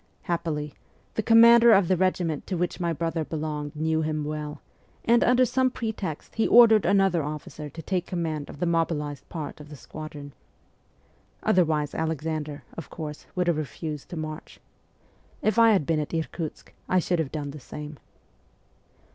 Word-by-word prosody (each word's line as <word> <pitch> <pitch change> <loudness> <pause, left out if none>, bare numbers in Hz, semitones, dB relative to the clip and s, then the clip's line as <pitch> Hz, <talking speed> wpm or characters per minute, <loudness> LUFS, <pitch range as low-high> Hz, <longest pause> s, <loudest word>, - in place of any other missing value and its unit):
Happily, 160 -4 -2 0.4
the - - 0
commander 235 +1 +7
of 195 -3 +5
the 185 - +3
regiment 175 -4 0
to 185 - -2
which 175 +1 -2
my 170 -1 0
brother 165 0 -1
belonged 150 -1 -4
knew 160 +1 0
him 155 -1 -1
well, 150 0 -5 0.5
and, 235 +1 +5
under 250 +1 +4
some 260 +2 +2
pretext, 220 - -5
he 225 - +1
ordered 225 -4 +7
another 195 -3 +3
officer 150 0 -6
to 165 +4 -9
take 180 0 -2
command 160 -4 -3
of - - -9
the - - 0
mobilized 160 -4 -1
part 155 -2 -6
of 150 0 -11
the 150 - -9
squadron. 145 -1 -9 1.1
Otherwise 155 -5 +2
Alexander, 155 -2 -3
of 165 - -8
course, 150 -3 -7
would 180 -1 +1
have 170 -3 +1
refused 155 0 -5
to 175 - -6
march. 155 0 -7 0.8
If 215 +2 +2
I 230 -1 +7
had 190 -9 +2
been 160 0 +1
at 150 +2 -3
Irkutsk, 160 0 -5 0.2
I 185 - +3
should 175 -1 +1
have 155 -4 -1
done 145 -2 -4
the 150 - -9
same. 150 +2 -9
160 Hz, 165 wpm, -26 LUFS, 150-185 Hz, 1.1 s, commander